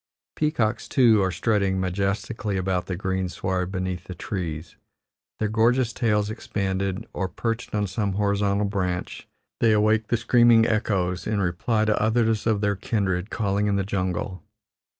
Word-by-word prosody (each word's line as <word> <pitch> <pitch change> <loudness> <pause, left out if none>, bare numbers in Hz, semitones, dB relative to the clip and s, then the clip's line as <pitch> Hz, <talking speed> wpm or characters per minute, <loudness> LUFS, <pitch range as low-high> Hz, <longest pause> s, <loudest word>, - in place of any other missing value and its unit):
Peacocks, 145 -8 0
too, 115 -6 +4
are 95 - +2
strutting 95 0 0
majestically 100 +3 -2
about 95 -1 -1
the 90 - -2
greensward 95 0 -2
beneath 95 -1 -3
the 95 - -7
trees, 80 -5 -5 0.6
their 110 - 0
gorgeous 115 +2 +2
tails 105 -3 +1
expanded, 100 -1 -2
or, 95 - -2
perched 115 +2 -3
on 105 -1 +1
some 100 +1 -2
horizontal 100 0 +1
branch, 90 -3 -3 0.3
they 115 - +4
awake 110 +1 +2
the 120 - +1
screaming 120 0 +5
echoes 95 -5 0
in 105 -1 0
reply 100 +5 0
to 105 -1 +1
others 110 0 +1
of 110 -2 +2
their 100 -1 +1
kindred 95 -2 -1
calling 100 -1 0
in 100 - +1
the 100 - +1
jungle. 95 -1 -2
100 Hz, 150 wpm, -24 LUFS, 95-110 Hz, 0.6 s, screaming